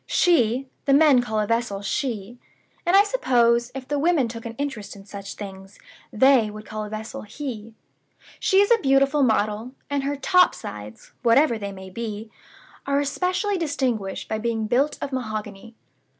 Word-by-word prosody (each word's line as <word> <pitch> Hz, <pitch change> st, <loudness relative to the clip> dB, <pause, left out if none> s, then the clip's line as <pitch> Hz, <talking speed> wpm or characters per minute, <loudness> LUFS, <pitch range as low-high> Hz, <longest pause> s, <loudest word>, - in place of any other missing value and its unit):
She 265 Hz, -7 st, +2 dB, 0.2 s
(the 275 Hz, -, +4 dB
men 290 Hz, -4 st, +6 dB
call 220 Hz, -3 st, -2 dB
a 210 Hz, -, +1 dB
vessel 230 Hz, -3 st, -1 dB
'She'; 235 Hz, 0 st, -3 dB, 0.5 s
and 355 Hz, -, +4 dB
I 400 Hz, -, +8 dB
suppose, 240 Hz, -, +2 dB
if 260 Hz, -1 st, -7 dB
the 290 Hz, 0 st, -1 dB
women 310 Hz, -4 st, +2 dB
took 230 Hz, 0 st, -7 dB
an 230 Hz, -, -8 dB
interest 250 Hz, -7 st, -5 dB
in 195 Hz, -1 st, -13 dB
such 200 Hz, 0 st, -8 dB
things, 195 Hz, -1 st, -9 dB, 0.3 s
they 250 Hz, -1 st, +4 dB
would 215 Hz, +1 st, -9 dB
call 215 Hz, 0 st, -5 dB
a -, -, -8 dB
vessel 215 Hz, +1 st, -6 dB
'He') 225 Hz, -1 st, -7 dB, 0.6 s
she 385 Hz, 0 st, +4 dB
is 405 Hz, -, +2 dB
a 465 Hz, -, +5 dB
beautiful 275 Hz, +2 st, +3 dB
model; 220 Hz, 0 st, +1 dB, 0.2 s
and 285 Hz, -1 st, 0 dB
her 280 Hz, +1 st, -2 dB
'top 360 Hz, +6 st, +4 dB
sides' 105 Hz, +1 st, -9 dB
(whatever 235 Hz, 0 st, +4 dB
they 200 Hz, -1 st, -5 dB
may 190 Hz, -1 st, -10 dB
be) 220 Hz, +1 st, -6 dB, 0.6 s
are 280 Hz, 0 st, +2 dB
especially 365 Hz, +7 st, -1 dB
distinguished 255 Hz, -, -2 dB
by 220 Hz, -, -2 dB
being 225 Hz, -1 st, -1 dB
built 260 Hz, +7 st, +1 dB
of 275 Hz, -, -5 dB
mahogany. 215 Hz, -3 st, -5 dB
235 Hz, 170 wpm, -24 LUFS, 215-280 Hz, 0.6 s, I